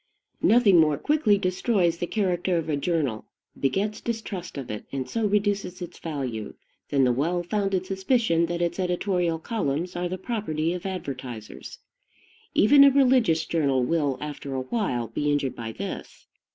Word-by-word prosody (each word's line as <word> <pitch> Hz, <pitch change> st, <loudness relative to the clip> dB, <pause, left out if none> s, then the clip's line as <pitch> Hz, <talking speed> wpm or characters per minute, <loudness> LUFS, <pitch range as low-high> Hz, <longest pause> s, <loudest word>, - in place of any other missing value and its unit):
Nothing 215 Hz, -6 st, +5 dB
more 150 Hz, -2 st, +4 dB
quickly 290 Hz, -, +2 dB
destroys 185 Hz, -2 st, +1 dB
the 175 Hz, -, -2 dB
character 180 Hz, -3 st, 0 dB
of 165 Hz, -1 st, -3 dB
a 150 Hz, -, +1 dB
journal, 140 Hz, -7 st, -1 dB, 0.3 s
begets 200 Hz, +10 st, 0 dB
distrust 210 Hz, -8 st, -5 dB
of 135 Hz, -5 st, -5 dB
it, 105 Hz, -, -6 dB
and 135 Hz, -2 st, -3 dB
so 225 Hz, -2 st, 0 dB
reduces 200 Hz, -2 st, 0 dB
its 175 Hz, -1 st, -8 dB
value, 130 Hz, -9 st, -4 dB, 0.3 s
than 140 Hz, -2 st, +3 dB
the 125 Hz, -, +4 dB
well 165 Hz, +8 st, 0 dB
founded 195 Hz, 0 st, -1 dB
suspicion 190 Hz, -3 st, +1 dB
that 175 Hz, 0 st, -1 dB
its 170 Hz, +2 st, -2 dB
editorial 180 Hz, -2 st, 0 dB
columns 170 Hz, -3 st, -2 dB
are 175 Hz, 0 st, -2 dB
the 185 Hz, -, -3 dB
property 175 Hz, -7 st, -2 dB
of 180 Hz, +1 st, -5 dB
advertisers. 130 Hz, -, -7 dB, 0.8 s
Even 280 Hz, +7 st, +7 dB
a 280 Hz, -, +9 dB
religious 250 Hz, -, +3 dB
journal 140 Hz, -6 st, +1 dB
will, 145 Hz, -1 st, 0 dB
after 145 Hz, -2 st, -6 dB
a 130 Hz, -, -1 dB
while, 130 Hz, -, -1 dB
be 145 Hz, +6 st, -1 dB
injured 140 Hz, -2 st, 0 dB
by 115 Hz, -1 st, -5 dB
this. -, -, -7 dB
175 Hz, 160 wpm, -25 LUFS, 145-200 Hz, 0.8 s, a